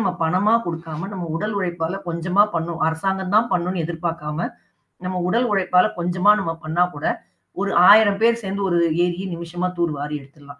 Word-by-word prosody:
நம்ம 195 -4 +1
பணமா 185 +6 +2
குடுக்காம 165 +1 -5
நம்ம 185 -3 -5
உடல் 210 +5 -3
உழைப்பால 175 -1 -2
கொஞ்சமா 175 +4 +2
பண்ணும். 165 0 -2
அரசாங்கம் 190 +4 -1
தான் 230 +3 +3
பண்ணும்னு 180 0 -1
எதிர்பார்க்காம 165 -1 -3 0.6
நம்ம 185 0 -2
உடல் 240 +4 +1
உழைப்பால 185 -1 +3
கொஞ்சமா 180 +3 +2
நம்ம 165 -4 -2
பண்ணா 165 +3 +2
கூட 145 +1 -5 0.6
ஒரு 200 -1 -1 0.2
1000 205 -1 +6
பேர் 235 0 +3
சேர்ந்து 195 +1 -3
ஒரு 175 -1 +2 0.3
ஏரியை 180 +2 -3
நிமிஷமா 170 +2 -4
தூர் 170 -2 +1
வாரி 150 +1 -4
எடுத்துடலாம். 140 +1 -16
175 Hz, 165 wpm, -21 LUFS, 165-195 Hz, 0.6 s, 1000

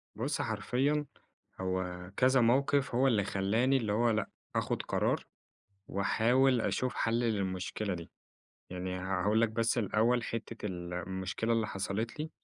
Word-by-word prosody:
بُص 135 +7 -1
حرفيًا 125 +7 0 0.6
هو 95 -1 -3
كذا 130 0 +5
موقِف 135 +2 +2
هو 130 +2 +4
اللي 110 -6 +3
خلّاني 110 +8 +2
اللي 110 -5 -1
هو 115 +3 +3
لأ، 110 -1 0 0.3
آخُد - - 0
قرار - - 0 0.6
وأحاول 120 +6 +3
أشوف 130 +2 -1
حل 115 +1 +1
للمشكلة 100 -2 -1
دي. 85 -1 -8 0.6
يعني 90 0 -4
هاقول 95 +4 +1
لك 115 - +3
بس 115 +2 0
الأوّل 115 +2 +2
حتّة 115 0 -5
المشكلة 95 +4 -3
اللي 115 -2 +1
حصلت 110 +5 -3
لي 155 +1 -3
110 Hz, 135 wpm, -32 LUFS, 95-120 Hz, 0.6 s, كذا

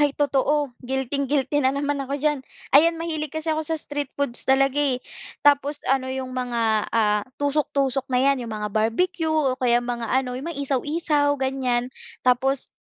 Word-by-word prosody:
Ay 290 -1 +2
totoo 290 -1 +1
guilting-guilty 265 +2 0
na 265 +1 +1
naman 285 0 -1
ako 275 +1 -3
diyan, 295 0 0 0.3
ayan 330 +4 +6
mahilig 315 -2 -3
kasi 315 +2 -2
ako 315 - -1
sa 325 - 0
street 290 -2 -4
foods 280 -4 -2
talaga, 275 +1 +3
eh. 275 -4 +2 0.5
Tapos 290 0 +3
ano 260 0 +1
yung 260 0 -4
mga, 235 -4 0
ah, 210 -2 +2 0.2
tusok-tusok 280 -2 0
na 255 - 0
yan 270 +1 +3
yung - - -7
mga 210 0 -3
barbecue 320 - 0
o 285 -5 +1
kaya 240 -1 +3
mga 240 -2 -3
ano 255 -1 0
yung 285 - -7
may 335 - -5
isaw-isaw 290 +1 0
ganyan 260 -2 -1 0.3
tapos, 255 +2 +2
275 Hz, 170 wpm, -24 LUFS, 255-290 Hz, 0.5 s, ayan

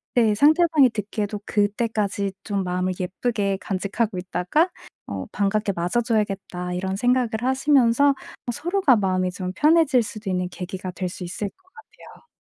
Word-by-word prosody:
네 225 -4 +4
상대방이 305 +1 +5
듣기에도 210 -1 -3
'그때까지 205 -1 0
좀 200 -2 -2
마음을 180 +1 -1
예쁘게 200 +1 -1
간직하고 200 +2 -2
있다가 185 - +1 0.4
어 - - -4
반갑게 205 +1 0
맞아줘야겠다.' 195 -2 -1
이런 190 +1 -2
생각을 245 +2 +2
하시면서 265 0 +3 0.4
뭐 240 - -1
서로가 350 - +2
마음이 185 -2 0
좀 180 0 -5
편해질 300 -5 +4
수도 215 -1 -7
있는 180 -1 -1
계기가 185 0 -6
될 180 0 -4
수 180 - -8
있을 195 +3 -4
것 370 - -33
같아요. 290 +9 -17
210 Hz, 350 characters per minute, -23 LUFS, 185-245 Hz, 0.4 s, 상대방이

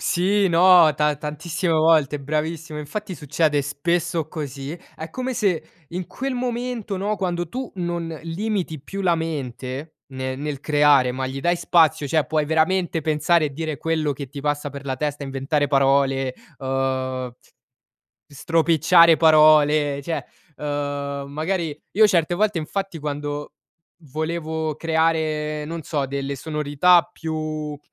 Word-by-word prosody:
Sì, 195 +3 +2
no, 170 -2 +6
ta 150 0 +1
tantissime 160 +4 -3
volte, 155 -3 +3
bravissimo, 155 +2 -3
infatti 185 +6 -5
succede 150 0 +1
spesso 165 +3 -1
così. 145 0 -6 0.2
È 160 0 -8
come 255 +6 -3
se 185 -9 0 0.2
in 180 +2 -5
quel 270 0 -4
momento, 245 -4 -3
no, 205 +3 -1
quando 175 -3 -2
tu 255 +6 -5
non 175 -2 -2 0.2
limiti 170 -2 -3
più 195 +8 -7
la 175 -3 +2
mente 140 -2 -5 0.2
ne 130 0 -4
nel 145 0 -4
creare, 145 -4 +4
ma 130 +1 -3
gli 135 +1 -5
dai 175 +4 +2
spazio, 165 -4 +3
cioè 155 +1 +1
puoi 155 -1 0
veramente 160 +2 +1
pensare 155 +2 +2
e 145 - -6
dire 155 +1 -4
quello 160 -1 -1
che 140 -1 -7
ti 140 +2 -8
passa 145 0 -2
per 140 0 -9
la 135 -1 -2
testa, 145 +1 -3
inventare 135 +2 -1
parole, 135 -1 +2 0.3
uhm, 130 -1 -2 1.0
stropicciare 165 +2 +4
parole, 155 -2 +5
cioè, 165 +4 -3 0.3
uhm, 145 -1 -3
magari 160 +1 -2
io 215 +2 +5
certe 175 -3 +2
volte 210 0 +1
infatti 185 +2 -4
quando 145 0 -4 0.6
volevo 160 -1 -2
creare, 155 -2 0
non 165 +2 -5
so 145 -3 -1
delle 140 +1 -3
sonorità 150 +4 +3
più, 160 -1 -5
uhm, 155 -1 -4
155 Hz, 140 wpm, -22 LUFS, 145-170 Hz, 1.0 s, no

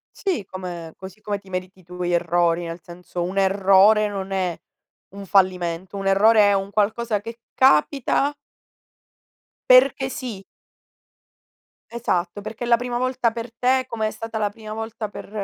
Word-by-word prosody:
Sì, 370 - -2
come 175 -4 -7
così 190 +3 -11
come 205 -1 -3
ti 195 -1 -19
meriti 185 0 -6
tu 180 +1 -7
gli 175 - -1
errori, 175 0 +1
nel 165 +1 -7
senso 175 0 -6
un 185 +3 -4
errore 195 +2 +4
non 195 -1 -5
è 185 -3 -1 0.5
un 200 0 -8
fallimento, 185 -1 +1
un 195 0 -5
errore 205 +2 +5
è - - +3
un 195 0 -1
qualcosa 215 +1 0
che 230 +2 -9
capita 265 - +3 1.4
perché 260 +1 +5
sì. 245 -7 -6 1.5
Esatto, 185 -5 -1
perché 215 +3 -7
è 240 - -3
la 235 - +5
prima 245 0 -3
volta 255 -1 0
per 230 0 -7
te 255 +2 +2
come 230 -4 -2
è - - -3
stata 225 +1 -6
la 210 -1 0
prima 215 0 -11
volta 220 0 -5
per - - -10
205 Hz, 160 wpm, -22 LUFS, 185-230 Hz, 1.5 s, errore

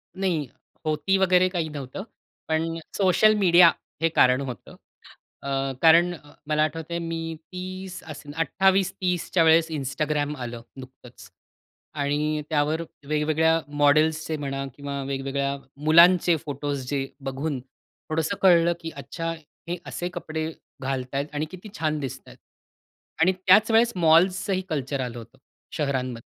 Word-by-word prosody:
नाही, 180 -7 -1 0.4
होती 155 +5 +1
वगैरे 185 -1 +4
काही 170 -4 -2
नव्हतं. 145 +4 -7 0.4
पण 165 +1 -1 0.2
सोशल 200 +2 +4
मीडिया 175 -3 +7 0.3
हे 165 - +3
कारण 130 -4 +4
होतं. 125 -6 -7 0.7
अ, 140 - -4 0.3
कारण 165 +2 +6
अ, 145 -3 -14
मला 150 0 +2
आठवत 160 +1 -2
आहे 170 - -1
मी 165 -1 -4 0.2
30 185 0 -6
असेन, 145 -2 -9
28-30 185 0 +1
च्या 170 -3 +5
वेळेस 160 0 +5
Instagram 150 +1 -2
आलं 120 -2 -6 0.2
नुकतंच. 130 -2 -13 0.7
आणि 150 +1 0
त्यावर 155 +1 +1 0.3
वेगवेगळ्या 155 +2 +2 0.2
मॉडेल्सचे 155 +2 +3
म्हणा 135 -1 -4
किंवा 140 0 -5
वेगवेगळ्या 140 +1 -2 0.3
मुलांचे 170 +2 +6
फोटोज् 145 -2 -4
जे 135 -2 -1 0.2
बघून 135 +1 -3 0.5
थोडंसं 160 +4 -1
कळलं 175 -2 +5
की 165 - -6
अच्छा! 165 -1 -5 0.4
हे 175 - -2
असे 175 - -4
कपडे 160 -3 -4 0.3
घालत 130 0 -3
आहेत 140 +1 0
आणि 150 +1 -1
किती 185 +3 -10
छान 155 -1 0
दिसत 135 -3 -5
आहेत. - - -14 0.8
आणि 185 +3 +5
त्याच 190 +4 +4
वेळेस 230 +1 +4
मॉल्सचंही 180 +3 +3
कल्चर 140 -3 -2
आलं 125 -2 -5
होतं 120 +3 -12 0.4
शहरांमध्ये. 130 -5 -2
155 Hz, 135 wpm, -25 LUFS, 140-175 Hz, 0.8 s, मीडिया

